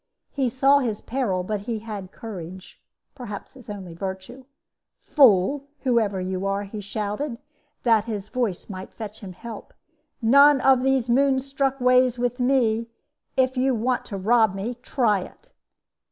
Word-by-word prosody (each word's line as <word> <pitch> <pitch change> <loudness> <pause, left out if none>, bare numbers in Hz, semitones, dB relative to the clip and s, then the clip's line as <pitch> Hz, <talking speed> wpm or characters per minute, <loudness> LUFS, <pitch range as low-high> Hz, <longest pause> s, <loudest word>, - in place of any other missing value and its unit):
"He 270 -3 0
saw 270 +3 +4
his 225 -6 -2
peril, 225 -8 -2
but 210 +2 -2
he 225 +3 -4
had 210 -4 -7
courage 185 -5 -9 0.3
perhaps 240 -6 -8
his 255 -5 -15
only 190 -4 -7
virtue. 190 +8 -7 0.5
'Fool! 275 +1 +4
whoever 225 -7 +1
you 185 0 -3
are,' 195 +1 -1
he 205 +1 -7
shouted, 210 +6 -4 0.5
that 225 -3 +3
his 210 -3 -5
voice 220 -6 -2
might 190 -2 -8
fetch 215 -1 -7
him 190 -3 -9
help; 225 +3 -10 0.4
'none 280 +4 +6
of 265 -2 +5
these 265 -2 +1
moon 265 +2 +3
struck 275 0 -1
ways 250 0 +4
with 245 +1 -1
me! 240 -3 +2 0.5
If 260 0 +2
you 260 0 +2
want 245 +3 -1
to 200 - -6
rob 220 0 +3
me, 205 +5 -3
try 230 -6 +1
it!' 180 - -12
230 Hz, 155 wpm, -24 LUFS, 200-260 Hz, 0.5 s, none